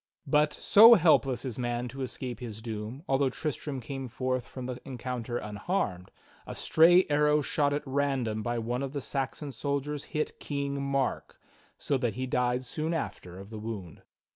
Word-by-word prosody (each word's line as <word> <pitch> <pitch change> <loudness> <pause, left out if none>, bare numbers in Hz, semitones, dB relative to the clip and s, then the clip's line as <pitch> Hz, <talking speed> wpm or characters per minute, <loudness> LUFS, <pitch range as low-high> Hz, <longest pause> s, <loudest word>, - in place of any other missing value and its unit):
But, 150 +1 +3
so 225 +8 +8
helpless 140 - +3
is 125 -2 -4
man 120 0 -1
to 135 +3 -7
escape 125 -1 -4
his 110 -3 -7
doom, 115 +4 -5
although 135 0 +2
Tristram 145 0 -4
came 135 +2 -5
forth 130 +1 -2
from 130 -1 -7
the 125 -1 -5
encounter 125 -2 -4
unharmed, 105 - -2 0.4
a - - -6
stray 175 +3 +5
arrow 150 0 +3
shot 145 0 +1
at 145 +1 -1
random 135 -5 0
by 120 +2 -2
one 120 +2 -2
of 135 0 -4
the 145 - -2
Saxon 140 +2 -3
soldiers 140 +3 -3
hit 150 0 -3
King 140 -1 -3
Mark, 140 -1 -2 0.4
so 140 - -1
that 120 -5 -1
he 130 +1 -2
died 125 0 0
soon 155 +6 -2
after 90 - -5
of 100 +3 -11
the 110 - -6
wound. 105 -8 -7
130 Hz, 170 wpm, -29 LUFS, 120-145 Hz, 0.4 s, so